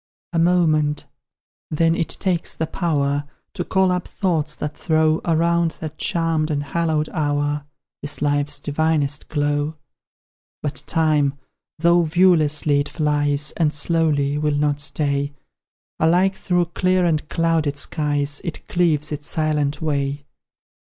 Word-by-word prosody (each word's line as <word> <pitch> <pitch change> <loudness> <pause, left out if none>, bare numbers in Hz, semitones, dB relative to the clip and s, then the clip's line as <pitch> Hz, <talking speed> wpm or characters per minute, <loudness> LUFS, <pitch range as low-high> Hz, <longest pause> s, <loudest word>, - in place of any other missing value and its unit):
A 165 - +1
moment, 155 -4 +2 0.6
then, 165 +1 +2
it 165 -1 -1
takes 180 -4 -1
the 160 - -1
power 145 -4 -1 0.3
To 180 - -3
call 190 +1 +2
up 180 -1 -2
thoughts 160 -5 -1
that 150 0 -5
throw 155 -1 +1
Around 170 0 +2
that 155 -1 -7
charmed 165 -2 0
and 145 -2 -1
hallowed 155 +1 0
hour, 145 -2 -1 0.3
This 145 0 -2
life's 145 0 0
divinest 150 0 -1
glow. 145 +1 0 0.9
But 145 -1 -3
Time, 150 -4 +2 0.4
though 170 +2 +4
viewlessly 155 -4 +3
it 145 - -2
flies, 150 -2 0
And 160 -3 +2
slowly, 150 -2 +1
will 150 -1 0
not 145 0 +1
stay; 140 -1 -1 0.7
Alike, 180 +4 +3
through 180 -2 0
clear 185 -1 +2
and 155 -3 0
clouded 165 -3 +1
skies, 145 -1 -1
It 170 -4 -6
cleaves 155 -4 +1
its 145 0 -5
silent 150 -1 0
way. 140 -2 -1
155 Hz, 130 wpm, -21 LUFS, 145-165 Hz, 0.9 s, though